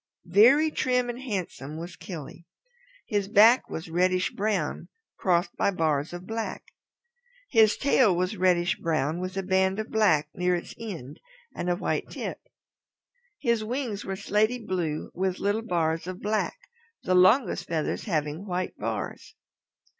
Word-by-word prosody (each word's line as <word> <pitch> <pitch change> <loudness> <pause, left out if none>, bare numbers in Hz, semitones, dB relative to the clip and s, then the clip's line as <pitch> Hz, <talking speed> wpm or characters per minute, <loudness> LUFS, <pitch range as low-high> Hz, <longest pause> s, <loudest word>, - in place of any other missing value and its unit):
Very 245 - +5
trim 250 -3 +1
and 240 +2 -9
handsome 180 - -4
was 170 +2 -7
Killy. 170 -2 -9 0.6
His 205 -4 -1
back 220 +4 +6
was 160 - -5
reddish 185 +2 +1
brown 210 0 -2 0.3
crossed 175 -1 +1
by - - +2
bars 155 -5 0
of 175 +1 -8
black. 225 +2 -4 0.9
His 220 -2 +5
tail 255 -8 +4
was 185 +4 -1
reddish 180 -2 +2
brown 155 0 -1
with 185 +1 -5
a 195 - -1
band 190 +1 +2
of 220 +1 -4
black 185 -10 +3
near 180 0 +1
its 175 - -6
end 170 - -7 0.4
and 175 - -2
a 175 - +2
white - - -2
tip. - - -5 1.0
His 235 -2 0
wings 235 -3 -3
were 195 - -4
slaty 210 +4 +1
blue 180 -9 -3
with 185 0 -1
little 205 +2 0
bars 165 -5 -1
of 185 0 -5
black, 215 - -1 0.5
the 185 - +1
longest 185 +8 +4
feathers 160 +6 -2
leaving 155 +1 -2
white 180 0 -2
bars. 110 +1 -5
185 Hz, 145 wpm, -27 LUFS, 170-215 Hz, 1.0 s, back